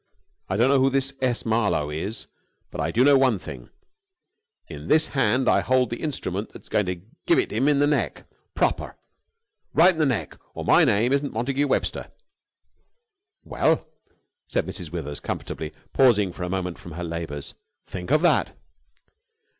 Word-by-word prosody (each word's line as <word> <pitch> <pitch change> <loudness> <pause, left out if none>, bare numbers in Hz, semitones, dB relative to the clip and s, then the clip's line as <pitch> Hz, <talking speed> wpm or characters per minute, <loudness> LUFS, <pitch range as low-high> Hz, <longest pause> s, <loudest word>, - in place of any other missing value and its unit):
I 95 - 0
don't 120 +4 +4
know 140 -1 +4
who 135 +1 +4
this 135 0 0
S. 125 -2 0
Marlowe 105 -10 +1
is, 95 +9 -4 0.5
but - - -4
I - - 0
do 125 - +3
know 140 0 +6
one 130 -5 +3
thing; - - -10 1.0
in - - -9
this 155 +1 +4
hand 130 -1 +1
I - - +5
hold 130 -2 +1
the 120 - -4
instrument 110 - -3
that's - - -14
going 105 -3 +1
to 90 -1 -3 0.3
give - - +5
it - - +1
him 120 +6 +1
in 145 -1 +4
the 145 - +4
neck, 145 0 -1 0.3
proper! - - -1 0.8
Right 180 +3 +6
in 160 - -8
the 155 - +3
neck, 125 -4 -2 0.2
or - - -5
my - - +6
name 115 +6 +2
isn't 140 0 0
Montagu 135 +6 0
Webster!" - - -1 1.3
"Well!" - - +1 0.6
said - - -1
Mrs. 85 -6 -6
Withers 75 -4 -5
comfortably, 75 - -5 0.2
pausing 105 -8 +4
for 90 - -11
a 90 - -2
moment 90 -2 -3
from 85 - -10
her 90 +2 -5
labours. 80 -4 -5 0.3
"Think 90 +2 -7
of 155 +4 +3
that!" 175 - +2
120 Hz, 170 wpm, -24 LUFS, 90-135 Hz, 1.3 s, know